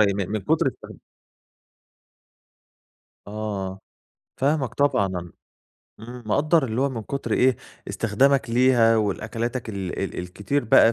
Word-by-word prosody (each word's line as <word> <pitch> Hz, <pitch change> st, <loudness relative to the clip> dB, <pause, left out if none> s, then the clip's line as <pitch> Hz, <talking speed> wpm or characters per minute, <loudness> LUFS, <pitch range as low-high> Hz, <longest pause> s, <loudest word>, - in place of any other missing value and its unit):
من 100 Hz, -2 st, -2 dB
من 110 Hz, 0 st, -1 dB
كُتر -, -, +2 dB
استخد -, -, -7 dB, 2.3 s
آه، 100 Hz, -3 st, -4 dB, 0.6 s
فاهمك 135 Hz, -3 st, 0 dB
طبعًا 140 Hz, -9 st, +2 dB
ن 90 Hz, -2 st, -6 dB, 0.7 s
إمم 120 Hz, +2 st, -9 dB
مقدّر 150 Hz, +7 st, +2 dB
اللي 115 Hz, +1 st, -2 dB
هو 140 Hz, -, +2 dB
من 115 Hz, -4 st, -5 dB
كتر 140 Hz, +5 st, -4 dB
إيه 130 Hz, -1 st, +3 dB, 0.3 s
استخدامك 125 Hz, +3 st, +2 dB
ليها 120 Hz, -2 st, +4 dB
والأكلاتك 110 Hz, +4 st, -2 dB
ال 95 Hz, -4 st, -4 dB
ال 95 Hz, -, -3 dB
الكتير 100 Hz, +10 st, -2 dB
بقى 115 Hz, +1 st, +6 dB
115 Hz, 120 wpm, -24 LUFS, 100-130 Hz, 2.3 s, بقى